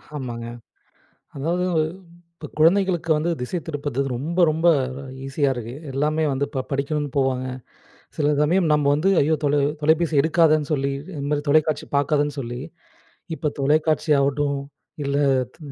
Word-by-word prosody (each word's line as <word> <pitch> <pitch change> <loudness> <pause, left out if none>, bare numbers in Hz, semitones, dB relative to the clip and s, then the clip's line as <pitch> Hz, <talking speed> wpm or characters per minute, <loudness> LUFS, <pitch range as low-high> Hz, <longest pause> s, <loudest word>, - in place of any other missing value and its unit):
ஆமாங்க. 120 -4 -5 0.9
அதாவது 170 +6 -1 0.7
இப்ப 160 -2 -9
குழந்தைகளுக்கு 170 0 +3
வந்து 155 +3 0
திசைதிருப்புறது 145 -1 -4 0.2
ரொம்ப, 155 +9 -4
ரொம்ப 160 +3 +2 0.6
ஈஸியா 135 +1 0
இருக்கு. 120 0 -6 0.2
எல்லாமே 150 +3 0
வந்து 135 +1 -1
ப 130 - -1
படிக்கணும்னு 145 +1 -1
போவாங்க. 130 -2 +1 0.7
சில 150 -1 +2
சமயம் 165 +2 +2
நம்ப 150 -1 +2
வந்து, 170 +6 +2
ஐயோ! 155 +3 +3
தொலை 145 0 +2 0.2
தொலைப்பேசி 160 +1 +2
எடுக்காதன்னு 155 -2 +3
சொல்லி, 140 -1 0 0.3
இந்த 140 - -4
மாதிரி 145 0 0
தொலைக்காட்சி 155 0 +2
பார்க்காதன்னு 145 0 +1
சொல்லி 120 -1 -5 0.8
இப்ப 150 - -1
தொலைக்காட்சி 155 +2 +1
ஆகட்டும், 140 +1 0 0.5
இல்லை 140 +1 +1 0.3
த - - -32
150 Hz, 130 wpm, -23 LUFS, 140-160 Hz, 0.9 s, குழந்தைகளுக்கு